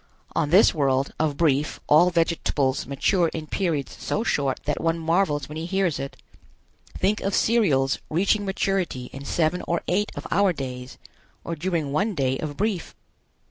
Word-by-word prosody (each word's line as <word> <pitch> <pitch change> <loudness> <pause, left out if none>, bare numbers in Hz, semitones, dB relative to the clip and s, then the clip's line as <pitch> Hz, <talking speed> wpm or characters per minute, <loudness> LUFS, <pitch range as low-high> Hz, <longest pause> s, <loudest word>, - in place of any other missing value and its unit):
On 145 - +1
this 185 +7 +6
world, 135 -3 +1
of 150 -3 0
Brief 150 -2 +1
all 165 +4 +5
vegetables 165 -5 0
mature 170 +6 +2
in 160 -1 -4
periods 155 -4 -2
so 215 - -1
short 140 - 0
that 150 - -1
one 165 0 +1
marvels 165 -4 +1
when 150 - -7
he 160 +1 -4
hears 190 -4 0
it. 140 - -6 0.8
Think 210 +2 +1
of 195 0 0
cereals 155 - +2
reaching 195 +6 +2
maturity 190 -9 -2
in 135 +1 -8
seven 170 +3 0
or 170 0 -1
eight 205 +4 0
of - - -7
our 195 0 +3
days, 125 -3 -6 0.5
or 170 - -4
during 165 -3 -2
one 200 +8 0
day 135 -2 0
of 145 -2 -5
Brief. 205 -5 -2
165 Hz, 165 wpm, -24 LUFS, 140-185 Hz, 0.8 s, this